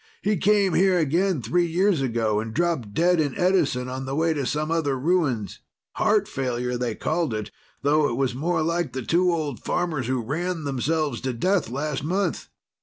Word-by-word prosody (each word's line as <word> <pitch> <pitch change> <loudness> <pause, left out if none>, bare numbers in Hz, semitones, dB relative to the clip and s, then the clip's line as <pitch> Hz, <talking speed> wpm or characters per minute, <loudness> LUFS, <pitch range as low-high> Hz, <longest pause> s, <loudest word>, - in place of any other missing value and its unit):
He 210 +1 +2
came 200 0 +3
here 190 0 +4
again 170 -1 +1
three 175 +11 +1
years 180 -1 +2
ago 115 -4 0
and 110 0 -5
dropped 165 -10 0
dead 175 +1 +3
in 150 +1 0
Edison 175 -9 +2
on 130 +1 -5
the 135 +1 -3
way 165 +1 +2
to 140 -4 -2
some 155 +1 -1
other 150 -5 0
ruins. 135 - 0 0.3
Heart - - +2
failure, 125 -2 -2
they 120 -2 -2
called 155 -7 -1
it, 105 -1 -5 0.3
though 145 +1 +3
it 120 - -2
was 130 -2 0
more 160 +5 0
like 170 -3 -1
the 130 -1 -4
two 180 +2 +2
old 155 -7 -2
farmers 160 -8 -1
who 130 0 0
ran 165 +6 -2
themselves 145 0 -1
to 130 -1 -2
death 180 - +1
last 140 +2 -3
month. 180 +2 -1
150 Hz, 185 wpm, -24 LUFS, 125-175 Hz, 0.3 s, here